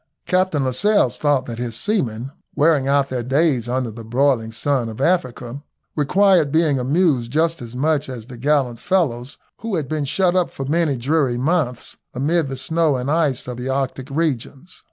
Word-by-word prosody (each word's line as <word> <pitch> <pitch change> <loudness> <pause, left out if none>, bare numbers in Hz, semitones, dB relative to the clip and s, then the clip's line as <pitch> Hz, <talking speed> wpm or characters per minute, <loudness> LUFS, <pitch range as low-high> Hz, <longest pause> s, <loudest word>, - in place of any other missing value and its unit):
Captain 185 -6 +1
Lascelles 130 - +2
thought 145 -3 +2
that 115 -2 -6
his 120 -2 -3
seamen, 130 - -1 0.2
wearing 150 -3 +3
out 140 0 +2
their 130 -2 -2
days 130 -1 +1
under 125 -2 -1
the 115 +1 -9
broiling 120 -1 +1
sun 120 +1 -1
of 110 - -9
Africa, 130 -5 -1 0.3
required 175 +1 +3
being 155 -4 +2
amused 135 -3 +1
just 160 +2 +1
as 120 0 -9
much 150 +1 0
as 120 -4 -7
the 125 +1 -10
gallant 130 -2 0
fellows 140 -9 -1 0.2
who 225 -3 -3
have 155 -5 -2
been 155 +1 -2
shut 175 +6 +1
up 180 -2 +2
for 135 - -6
many 150 -1 +1
dreary 135 0 +1
months 135 -3 -1 0.2
amid 150 +3 +1
the 135 - -5
snow 160 +2 +1
and 125 +3 -2
ice 150 -7 0
of 125 -1 -5
the 125 +2 -4
Arctic 135 0 -2
regions. 140 +1 -3
140 Hz, 175 wpm, -20 LUFS, 125-160 Hz, 0.3 s, wearing